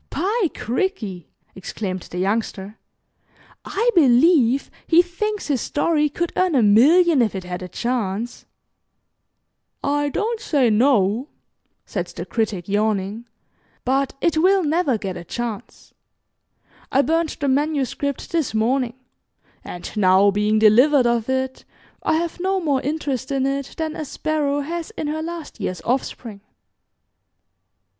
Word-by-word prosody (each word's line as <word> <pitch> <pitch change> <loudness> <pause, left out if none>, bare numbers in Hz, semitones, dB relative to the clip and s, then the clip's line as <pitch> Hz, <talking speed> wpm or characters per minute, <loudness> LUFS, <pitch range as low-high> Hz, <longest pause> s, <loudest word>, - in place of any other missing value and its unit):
"By 405 -1 0
cricky," 225 - -3 0.2
exclaimed 185 0 -5
the 180 - -7
Youngster, 200 +1 -2 0.8
"I 460 +4 0
believe 275 -3 +4 0.2
he 345 +1 +6
thinks 415 +4 -3
his 280 -5 0
story 300 0 +1
could 340 +4 -3
earn 365 -4 +2
a 250 - +4
million 290 - +5
if 215 -4 0
it 190 - -4
had 180 0 -6
a 180 - -6
chance." 230 +1 -3 1.4
"I 290 0 +1
don't 440 +8 -2
say 280 - +2
'no,'" 225 0 +2 0.6
said - - -4
the - - -7
Critic, 215 -6 -2
yawning, 210 +2 -1 0.6
"but 270 +1 0
it 335 -2 +1
will 380 +2 +4
never 300 -5 +1
get 195 -3 -5
a - - -8
chance. 235 +3 -6 1.0
I 275 - +3
burned 325 +1 0
the 285 - -1
manuscript 280 -1 -1
this 320 -9 -1
morning, 240 +2 +1 0.7
and 175 - -8
now 195 0 +4
being 210 +2 +1
delivered 245 +6 +5
of 235 0 +1
it, 260 0 -2 0.4
I - - +1
have 335 +1 -2
no 380 +1 0
more 285 -6 0
interest 280 -3 -3
in 270 -1 0
it 275 0 -3
than 315 -1 -3
a 310 - -4
sparrow 290 -1 -1
has 330 +3 -4
in - - -3
her 310 +1 -2
last 330 -5 -7
year's 185 -4 -3
offspring." 235 -4 -3
265 Hz, 135 wpm, -21 LUFS, 215-315 Hz, 1.4 s, he